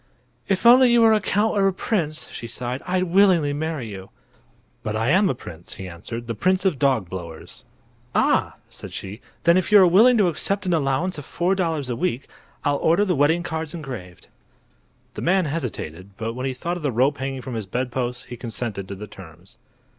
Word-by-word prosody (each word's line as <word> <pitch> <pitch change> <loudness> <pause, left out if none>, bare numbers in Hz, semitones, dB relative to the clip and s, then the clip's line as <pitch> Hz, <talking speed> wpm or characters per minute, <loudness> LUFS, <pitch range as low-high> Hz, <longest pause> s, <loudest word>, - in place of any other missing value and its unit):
"If 195 +3 0
only 250 +1 +8
you 240 0 +5
were 225 -1 +6
a 215 - +2
count 210 +2 +1
or 195 -1 +3
a 195 - +1
prince," 165 -6 -2
she 115 - -7
sighed, 125 +2 -4
"I'd 180 0 +1
willingly 180 -5 +3
marry 155 -4 -3
you." 95 -2 -9 0.7
"But 105 - -3
I 115 +3 0
am 190 +2 +4
a - - 0
prince," 85 -6 -10
he 95 - -7
answered; 105 +7 -7
"the 115 - -3
Prince 185 - +1
of 170 -9 +1
Dogblowers." 95 - -2 0.5
"Ah!" - - +2
said - - -11
she; 100 +5 -7 0.2
"then 170 +1 +5
if 185 +1 -1
you 210 - +9
are 190 - +8
willing 220 +8 +6
to 205 -4 +4
accept 195 +4 -1
an 180 - +1
allowance 155 +3 0
of 145 - -9
four 175 +3 0
dollars 165 -7 -1
a 125 - -2
week 135 -4 -2 0.4
I'll 145 0 +1
order 170 +8 +3
the 185 - +1
wedding 155 +5 +2
cards 160 -1 -4
engraved." 125 - -8 0.9
The - - -6
man 185 +1 +2
hesitated, 100 - -5
but 115 +1 -3
when 130 +2 -3
he 130 - -3
thought 170 +7 -3
of - - -8
the 145 -3 0
rope 130 +5 +1
hanging 135 -1 -4
from 130 - -6
his 110 -4 -4
bedpost 125 +2 -3
he 120 - -8
consented 115 -5 -5
to 100 - -6
the 105 +2 -8
terms. 90 -3 -14
145 Hz, 205 wpm, -23 LUFS, 115-180 Hz, 0.9 s, you